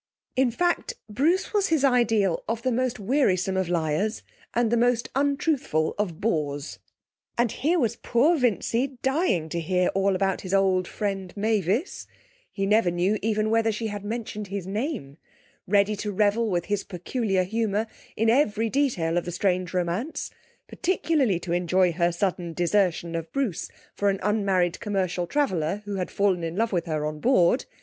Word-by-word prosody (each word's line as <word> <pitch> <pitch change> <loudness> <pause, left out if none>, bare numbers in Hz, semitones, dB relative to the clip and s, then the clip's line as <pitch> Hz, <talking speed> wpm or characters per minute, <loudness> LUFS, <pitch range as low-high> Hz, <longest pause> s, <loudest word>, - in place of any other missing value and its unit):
In 260 -1 +3
fact, 350 - 0
Bruce 305 - +1
was 405 -2 +2
his 320 -4 +1
ideal 225 -8 +2
of 230 0 -2
the 255 - +1
most 250 0 -1
wearisome 195 -5 +1
of 190 -2 0
liars 170 +5 0 0.3
and 235 -1 +2
the - - +4
most 240 0 +2
untruthful 280 - +1
of 180 -6 -2
bores; 150 -7 -2 0.6
and 235 -2 +2
here 325 +7 +1
was 235 -6 0
poor 280 +9 +3
Vincy 250 0 0
dying 265 - +1
to 170 - -2
hear 180 +2 +1
all 195 0 +1
about 195 0 0
his 190 +1 -1
old 190 -2 +2
friend, 195 -3 -3
Mavis 215 - 0 0.4
(he 195 - -2
never 210 -1 +3
knew 180 +5 +1
even 215 0 0
whether 225 0 +3
she 220 +1 -3
had 205 -1 -6
mentioned 210 -1 -4
his 195 -1 -4
name), 205 - -4 0.5
ready 200 +2 +3
to 210 +1 -3
revel, 210 +3 +2
with 175 -3 0
his 205 -1 -1
peculiar 195 +1 -1
humour, 215 +2 -1 0.3
in 225 - +2
every 225 -3 +2
detail 180 - +1
of - - -9
the 175 - -4
strange 180 -1 0
romance, 180 - -2 0.4
particularly 300 - +1
to 175 -1 -4
enjoy 180 +1 +2
her 170 +1 +1
sudden 175 -1 -2
desertion 175 -1 +1
of 165 -1 -4
Bruce 265 - -2 0.2
for 205 - +1
an 195 -1 -1
unmarried 195 -4 +1
commercial 185 -4 -1
traveller 195 - 0
who 205 -1 -4
had 180 - -2
fallen 195 -4 +1
in 165 0 -3
love 225 +3 0
with 175 -3 -1
her 155 -2 -1
on 150 0 -4
board. 240 - +3
205 Hz, 170 wpm, -25 LUFS, 180-235 Hz, 0.6 s, the